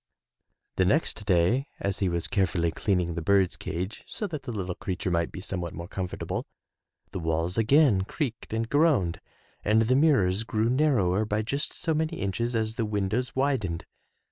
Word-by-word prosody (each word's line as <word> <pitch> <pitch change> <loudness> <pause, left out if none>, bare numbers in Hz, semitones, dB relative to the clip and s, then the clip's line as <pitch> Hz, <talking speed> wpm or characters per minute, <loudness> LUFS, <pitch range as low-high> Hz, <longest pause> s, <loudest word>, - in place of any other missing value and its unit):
The 95 - +4
next 110 - +1
day 100 - +3
as 100 -1 -2
he 95 - +1
was 85 -1 -1
carefully 90 -4 +1
cleaning 90 -3 0
the 85 - -3
bird's 95 +1 +3
cage 95 +3 -5
so 215 - -4
that 160 -7 -4
the 125 - -6
little 95 -5 -3
creature 95 -3 -3
might 85 -1 0
be - - -7
somewhat 90 -3 -4
more 85 +2 -6
comfort 95 -1 -4
able, - - -3 0.6
the - - -4
walls 80 +2 -1
again 115 -2 +4
creaked 125 -1 -4
and 115 +1 -1
groaned 145 - +2 0.4
and 110 +2 +4
the 125 +3 +2
mirrors 110 - +3
grew 110 +1 0
narrower 120 -9 +2
by 105 0 -1
just 140 +6 -2
so 165 - -1
many 160 +2 -1
inches 115 +5 -1
as 110 0 -1
the 115 - 0
windows 105 +4 -1
widened. 130 -11 0
105 Hz, 175 wpm, -27 LUFS, 90-125 Hz, 0.6 s, The